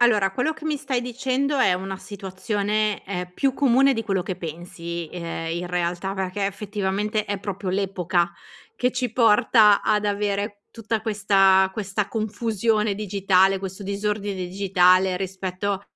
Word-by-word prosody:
Allora, 215 -5 +4
quello 250 +10 0
che 310 - -13
mi 310 -1 0
stai 270 -4 -2
dicendo 260 +3 -1
è 255 - +4
una 190 +1 -4
situazione, 205 +2 -2
ehm, 180 -2 -4
più 270 +4 +1
comune 270 0 +4
di 225 - -3
quello 195 -3 0
che 185 0 -4
pensi, 170 0 -6
ehm, 165 -2 -5
in 175 +1 -4
realtà. 180 +2 -2
Perché, 190 +1 -2
effettivamente, 205 +1 -2
è 205 -1 -3
proprio 200 -1 -5
l'epoca 185 -2 0 0.4
che 250 0 +1
ci 250 -2 -2
porta 215 -2 +5
ad 210 0 +1
avere 205 0 -1
tutta 225 -1 -3
questa 195 -3 +4
questa 200 0 -2
confusione 220 -1 0
digitale, 195 -1 +2
questo 190 +1 -7
disordine 205 0 -2
digitale 185 0 +3
rispetto 190 +1 -3
200 Hz, 145 wpm, -24 LUFS, 190-215 Hz, 0.4 s, porta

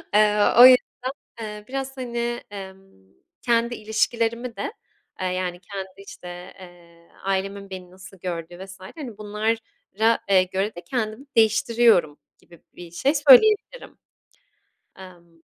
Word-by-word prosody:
Eee, 210 0 +4 0.2
o 250 - +12
yüzden, 255 -1 +7 0.6
eee, 210 -1 -7
biraz 270 0 -5
hani, 240 -1 -3
emm, 190 - -12 0.3
kendi 235 0 +1
ilişkilerimi 230 +2 -1
de, 430 - -4 0.5
aaa, 185 - -2
yani 180 -1 -3
kendi 195 -1 -7
işte, 180 -2 -10
eee, 170 -2 -17
ailemin 195 +1 -3
beni 185 -1 -9
nasıl 190 +1 -14
gördüğü 175 +1 -6
vs. 190 0 -13 0.2
hani 250 -9 -8
bunlara, 220 +1 -1
eee, 185 -1 +5
göre 190 +3 -3
de 175 - -8
kendimi 235 0 -3
değiştiriyorum 220 -7 +3 0.2
gibi 170 - -19
bir 175 -1 -11
şey 265 - +1
söyleyebilirim. 415 - +5 1.0
Emm 170 -3 -15
205 Hz, 125 wpm, -23 LUFS, 185-235 Hz, 1.0 s, o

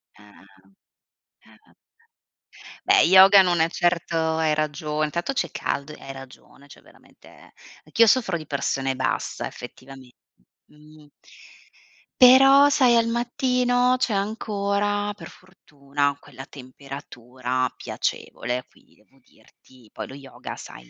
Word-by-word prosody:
Ah-ah, 105 -1 -20 1.0
ah-ah. - - -24 1.1
Beh, - - +5
yoga 190 +3 +7
non 175 -2 +1
è 165 +1 +2
certo 175 -1 -1 0.2
hai 160 -1 +1
ragione. 155 0 -2
Intanto 170 - -3
c'è 175 - -2
caldo 140 +2 -4
e - - -15
hai 135 - -8
ragione, 135 +1 -15
cioè - - -16
veramente - - -21 0.3
anch'io 225 +9 +3
soffro 210 -6 +2
di 155 - -10
pressione 135 -2 -2
bassa 130 - -3
effettivamen 130 -1 -12 0.6
mh. 150 0 -19 1.1
Però 270 +3 +7
sai, 255 -4 +3
al 230 - +3
mattino 245 +1 0
c'è 225 - 0
ancora 205 0 -2
per 205 - -12
fortuna 145 -6 -5
quella 135 -1 -13
temperatura 130 -2 -6
piacevole, 125 +2 -4
quindi - - -27
devo 135 +6 -29
dirti, 125 -2 -24
poi - - -7
lo - - -12
yoga, 135 -1 -10
sai, - - -13
155 Hz, 120 wpm, -23 LUFS, 135-205 Hz, 1.1 s, yoga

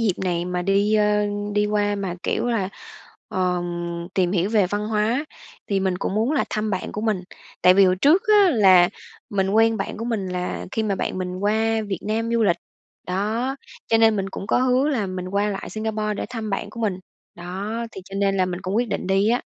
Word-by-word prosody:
dịp 220 -5 +2
này 175 -1 0
mà 180 0 -2
đi, 200 +3 +2
ơ, 210 -1 +3 0.3
đi 210 0 +2
qua 205 0 +1
mà, 195 -3 -3
kiểu - - -1
là, 225 -6 0 0.6
ờm, 175 -2 -2
tìm 180 -2 +2
hiểu 190 +1 +1
về 210 -4 +3
văn 205 +3 -2
hóa, 225 +6 +1 0.4
thì 195 -2 0
mình 185 -1 0
cũng 195 - -2
muốn 225 +7 +1
là 295 - +2
thăm 215 0 -1
bạn 190 - -3
của 210 - -4
mình. 215 -4 0 0.4
Tại 180 0 +7
vì 195 - +6
hồi 185 0 +3
trước 295 - +4
á, 415 -3 +6
là 190 - +6 0.4
mình 195 -1 0
quen 225 +2 +4
bạn - - -4
của 230 - -5
mình, 225 -5 -2
là 180 0 -3
khi 220 - 0
mà 210 -2 0
bạn 185 - -3
mình 180 0 -3
qua 220 +2 +1
Việt 195 -4 -2
Nam 225 +2 -1
du 230 -1 +2
lịch. 175 -4 +3 0.5
Đó, 220 +8 -1 0.3
cho 225 - +3
nên 225 -1 +5
mình 195 -1 -2
cũng 195 - -6
có - - +2
hứa 255 +2 +2
là 235 -9 0
mình 185 -1 -5
qua 200 +2 0
lại 195 - -5
Singapore 215 -1 -2
để - - -4
thăm 225 -3 -4
bạn 195 +1 -3
của 230 +2 -8
mình, 200 -4 0 0.4
đó, 185 +5 -5 0.2
thì - - -8
cho 195 - -11
nên 195 0 +1
là 185 - +2
mình 180 0 -4
cũng 190 +2 -2
quyết 240 +1 +1
định - - -3
đi 195 +2 +2
á. 240 +2 +2
205 Hz, 225 wpm, -23 LUFS, 185-220 Hz, 0.6 s, Tại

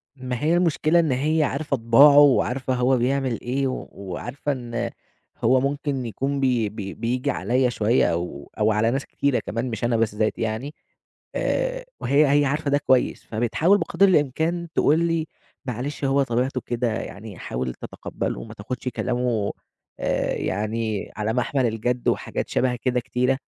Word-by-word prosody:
ما 130 -1 -4
هي 160 +2 +3
المشكلة 170 -1 +3
إن 160 -5 +2
هي 155 +5 +2
عارفة 140 0 -1
طِباعه 130 +5 +6
وعارفة 130 -2 +4
هو 125 +1 +2
بيعمل 130 -1 0
إيه 135 +2 -1
و 130 - -4
وعارفة 120 +9 -5
إن 120 -3 -3 0.5
هو 130 0 +5
ممكن 140 -1 -2
يكون 135 +5 -2
بي 125 -5 +1
بي 100 -2 -6
بييجي 125 +2 -1
عليَّ 125 +5 +1
شوية 110 -5 +2
أو 85 -4 -4
أو 110 +1 +3
على 110 +2 +2
ناس 135 +1 -2
كتيرة 140 -3 0
كمان 115 +3 -2
مش 110 -2 -5
أنا 120 -1 +2
بالذات 110 -1 0
يعني 115 +7 -3 0.6
آآ، - - -1 0.2
وهي 145 +2 +4
هي - - +2
عارفة 145 +1 -1
ده 145 - +4
كويس 130 -2 +1
فبتحاول 120 - +2
بقدْر 195 +3 +3
الإمكان 165 +1 +1
تقول 155 +3 +4
لي: 165 -1 0 0.4
"معلِش، 135 +4 -4
هو 135 +1 +3
طبيعته 125 +1 -1
كده، 120 0 -1
يعني 105 -3 -7
حاول 65 0 -4
تتقبّله، - - -5
ما - - -10
تاخدش 125 +5 -6
كلامه 120 -4 -1 0.5
آآ - - 0
يعني 110 +1 -2
على 110 +1 -1
محمَل 125 +2 +1
الجَد." 120 +2 -2
وحاجات - - -1
شَبه 125 -1 +1
كده 125 +1 0
كتيرة. 125 +2 0
125 Hz, 160 wpm, -24 LUFS, 115-140 Hz, 0.6 s, طِباعه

